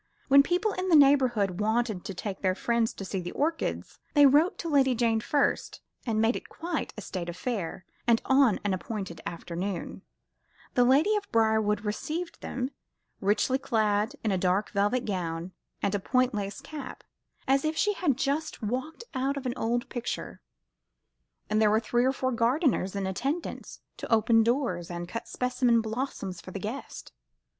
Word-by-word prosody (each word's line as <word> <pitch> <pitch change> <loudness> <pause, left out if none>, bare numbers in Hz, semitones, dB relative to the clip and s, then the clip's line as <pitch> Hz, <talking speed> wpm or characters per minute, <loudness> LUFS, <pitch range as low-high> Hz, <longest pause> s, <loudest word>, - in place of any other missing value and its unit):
When 280 +1 +9
people 360 +8 +1
in 370 0 -2
the 335 - +6
neighbourhood 255 - +4
wanted 220 -2 0
to 195 - -5
take 190 +1 -5
their 185 -1 +1
friends 235 +1 +1
to 195 - -7
see 190 +1 -3
the 175 - -6
orchids, 320 +3 -2 0.2
they 290 -1 +8
wrote 315 +8 +4
to 335 - -5
Lady 270 -4 +3
Jane 230 -1 +2
first, 285 +5 0 0.3
and 220 -2 +1
made 225 +2 +3
it - - -7
quite 335 -3 -3
a - - -5
state 175 -3 -5
affair; 180 -1 -4 0.2
and 230 -1 +5
on 265 -6 +4
an 205 -2 +1
appointed 185 -4 -5
afternoon, 175 +2 -5 0.7
the 245 - +4
lady 285 +12 +4
of 410 - -6
Briarwood 220 -2 +2
received 315 +11 -4
them, 255 +1 -3 0.5
richly 210 +6 +2
clad 215 +1 +1
in 220 - +1
a 190 - +1
dark 185 +3 +1
velvet 205 +5 +1
gown 175 -3 -3 0.3
and 200 - +1
a 205 - +1
point 255 +5 +1
lace 200 -1 -4
cap, 300 -3 -8 0.4
as 270 +1 +3
if 310 +1 -1
she 420 - +2
had 300 -10 0
just 285 0 -2
walked 260 - -3
out 270 +1 -1
of 275 - -5
an 250 - -1
old 240 +3 -1
picture, 240 -2 -5 1.1
and 215 +1 +1
there 215 - +5
were 215 +1 +4
three 240 +2 +1
or 260 - +4
four 260 -1 -1
gardeners 235 - +1
in 200 -1 -1
attendance 270 - -3 0.2
to - - -7
open 225 +1 +5
doors, 225 -8 0
and 175 0 -5
cut 230 - -6
specimen 250 -2 +2
blossoms 220 -5 -4
for - - -10
the 195 - -5
guests. 220 +8 -6
230 Hz, 175 wpm, -28 LUFS, 200-275 Hz, 1.1 s, When